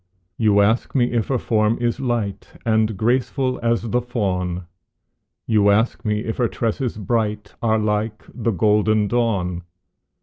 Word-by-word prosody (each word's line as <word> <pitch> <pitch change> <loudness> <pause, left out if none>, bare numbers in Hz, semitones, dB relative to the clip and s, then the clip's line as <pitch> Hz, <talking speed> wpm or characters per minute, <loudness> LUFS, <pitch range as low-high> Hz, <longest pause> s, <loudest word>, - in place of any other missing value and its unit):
You 105 -2 +3
ask 110 +7 +1
me 125 -2 +2
if 115 -3 0
her 135 - +1
form 110 -1 +1
is 120 -1 -1
light 115 -6 -3
And 110 -2 +1
graceful 130 +3 0
as 115 0 +1
the 120 +2 0
fawn; 90 -7 -2 0.8
You 105 -2 +3
ask 110 +4 +2
me 105 -2 0
if 110 0 -4
her 120 - +2
tresses 115 +1 -2
bright 105 -1 -2
Are 110 -1 +2
like 105 0 -1
the 120 -2 -2
golden 105 +1 +2
dawn? 100 -6 0
110 Hz, 145 wpm, -21 LUFS, 105-120 Hz, 0.8 s, You